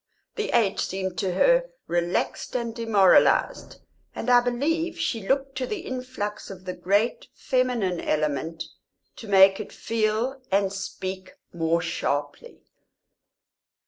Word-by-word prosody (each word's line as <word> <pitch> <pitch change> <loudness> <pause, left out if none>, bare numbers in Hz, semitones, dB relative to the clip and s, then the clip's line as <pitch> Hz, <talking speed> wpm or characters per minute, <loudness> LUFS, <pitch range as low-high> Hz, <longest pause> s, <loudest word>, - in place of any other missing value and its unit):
The 430 -2 -2
age 220 -5 +2
seemed 190 -2 -3
to 185 0 -1
her - - +4 0.2
relaxed 175 +6 -2
and 235 -2 -2
demoralised, 225 - +3 0.3
and 250 - -1
I 245 - +8
believe 320 +8 -1
she 225 -11 -2
looked 275 0 0
to 255 - -2
the 415 -4 -4
influx 255 -6 -5
of 185 -1 -10
the 185 - -3
great 200 +7 0
feminine 245 - 0
element 155 +2 -1 0.5
to 225 - -9
make 195 -1 +6
it - - -7
feel 225 +4 -1
and 195 0 +2
speak 190 -1 -6 0.2
more 165 0 0
sharply. 145 - -3
210 Hz, 125 wpm, -25 LUFS, 185-255 Hz, 0.5 s, I